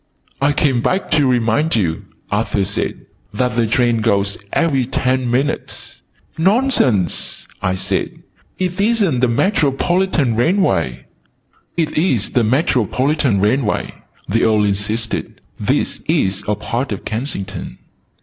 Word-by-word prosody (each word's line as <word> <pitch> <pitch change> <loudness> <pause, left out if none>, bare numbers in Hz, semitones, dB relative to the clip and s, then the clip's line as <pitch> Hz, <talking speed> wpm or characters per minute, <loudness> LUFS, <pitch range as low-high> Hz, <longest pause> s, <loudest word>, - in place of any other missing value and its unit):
"I 140 +1 +4
came 135 -4 +1
back 185 +10 -1
to 150 -3 +3
remind 125 +5 +2
you," 85 -7 -1 0.3
Arthur 105 -1 0
said, 100 +2 -3 0.3
"that 125 +2 0
the 115 -1 +2
trains 120 0 +2
go 100 -3 +2 0.3
every 135 -7 +1
ten 130 -1 0
minutes 130 +4 -2 0.2
" - - -36
"Nonsense!" 190 - +2
I 95 0 0
said. 95 - -2 0.3
"It 185 +1 -1
isn't 205 - +2
the 125 - +3
Metropolitan 155 - +1
Railway!" 105 - +1 0.7
"It 160 -3 0
is 130 - +1
the 120 - +2
Metropolitan 130 - +1
Railway," 110 +1 0 0.3
the 115 +4 +1
Earl 110 -1 +3
insisted. 105 +3 -2 0.2
"'This - - -1
is 95 0 +1
a 105 - +1
part 120 +5 -3
of 105 - -5
Kensington." 110 -4 -4
125 Hz, 125 wpm, -18 LUFS, 105-150 Hz, 0.7 s, I